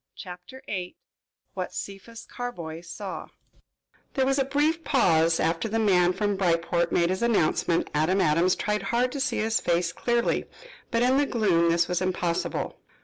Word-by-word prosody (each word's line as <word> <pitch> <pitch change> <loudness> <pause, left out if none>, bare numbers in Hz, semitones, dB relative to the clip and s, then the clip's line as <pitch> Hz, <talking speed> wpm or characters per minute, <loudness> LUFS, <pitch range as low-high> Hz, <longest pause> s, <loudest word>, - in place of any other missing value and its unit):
CHAPTER 180 +8 -10
VIII 180 -3 -5 0.6
WHAT - - -5
CEPHAS 200 +4 -7
CARBOY 170 -10 -6
SAW 185 +3 -7 0.9
There 265 -2 +2
was 270 +1 +1
a - - +4
brief 300 +4 +1
pause 165 - +3
after 165 +6 0
the 225 - -1
man 185 -5 +4
from 205 +2 -1
Bryport 170 -1 +1
made 170 +1 +2
his 185 - -2
announcement. 175 -6 +1
Adam 160 +6 +2
Adams 170 +2 +3
tried 210 0 -1
hard 245 +2 0
to 280 - -4
see 270 - 0
his 220 +1 +1
face 170 -1 0
clearly, 240 -1 0 0.4
but 230 -1 +1
in 255 +2 +3
the 285 0 +2
gloom 180 -9 +2
this 170 +1 +2
was 180 0 -1
impossible. 180 -2 -2
185 Hz, 160 wpm, -26 LUFS, 170-235 Hz, 0.9 s, a